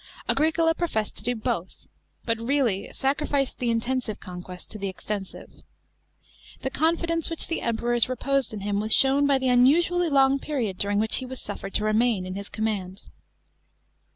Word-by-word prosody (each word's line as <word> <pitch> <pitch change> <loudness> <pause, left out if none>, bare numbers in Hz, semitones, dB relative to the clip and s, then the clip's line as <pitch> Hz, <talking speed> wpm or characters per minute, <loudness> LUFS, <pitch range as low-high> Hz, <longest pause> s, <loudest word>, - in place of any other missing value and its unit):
Agricola 320 +3 +3
professed 310 -12 -2
to - - -5
do 245 +1 0
both, 220 -6 -4 0.4
but 230 -1 0
really 235 -5 0
sacrificed 275 0 -1
the 245 - 0
intensive 230 -1 -1
conquest 180 0 -9
to 215 - -7
the 200 - -2
extensive. 195 +1 -6 1.1
The 265 - -1
confidence 330 +2 0
which 330 - 0
the 330 - -3
Emperors 235 +1 +1
reposed 270 0 +1
in 210 -2 -6
him 200 0 -1
was 215 +1 +3
shown 275 +1 +4
by 280 -1 +4
the 260 -1 0
unusually 330 +8 +4
long 275 -1 +4
period 245 -11 -3
during 205 0 0
which 220 +1 +3
he 260 - -3
was 260 0 -7
suffered 200 -1 -7
to - - +1
remain 215 -2 +2
in 185 - -5
his 200 +1 -6
command. 200 -4 -3
240 Hz, 165 wpm, -25 LUFS, 210-275 Hz, 1.1 s, shown